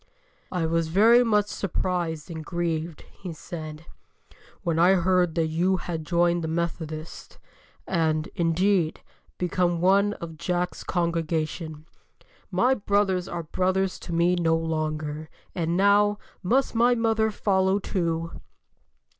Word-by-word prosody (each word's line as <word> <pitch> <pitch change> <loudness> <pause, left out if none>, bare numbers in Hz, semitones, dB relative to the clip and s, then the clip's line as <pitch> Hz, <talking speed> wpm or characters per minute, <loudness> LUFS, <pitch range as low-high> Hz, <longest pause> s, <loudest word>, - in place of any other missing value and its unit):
"I 180 -3 0
was 165 0 0
very 225 +8 +5
much 210 -3 +3
surprised 175 -5 -3
and 160 -1 -6
grieved," 165 -1 -3
he 180 -4 -8
said, 155 -1 -8 0.8
"when 165 -3 0
I 180 +3 +6
heard 180 -2 +2
that 165 -2 +2
you 175 +4 +1
had 165 -3 -5
joined 175 0 +2
the - - -2
Methodists, 160 -1 -4 0.5
and, 160 -3 0
indeed, 170 0 +1 0.4
become 175 -1 0
one 200 +3 +3
of 165 -5 -8
Jack's 180 0 -2
congregation. 165 -2 -2 0.6
My 255 +2 +3
brothers 200 -5 +1
are 170 -1 -4
brothers 185 +3 0
to 175 - -8
me 170 +1 +3
no 165 -2 +2
longer, 155 -1 -3 0.2
and 170 0 -1
now, 205 +1 +4 0.2
must 250 +8 +1
my 240 +2 +4
mother 225 -1 +2
follow 190 -2 +1
too?" 165 -4 -2
175 Hz, 125 wpm, -25 LUFS, 160-190 Hz, 0.8 s, I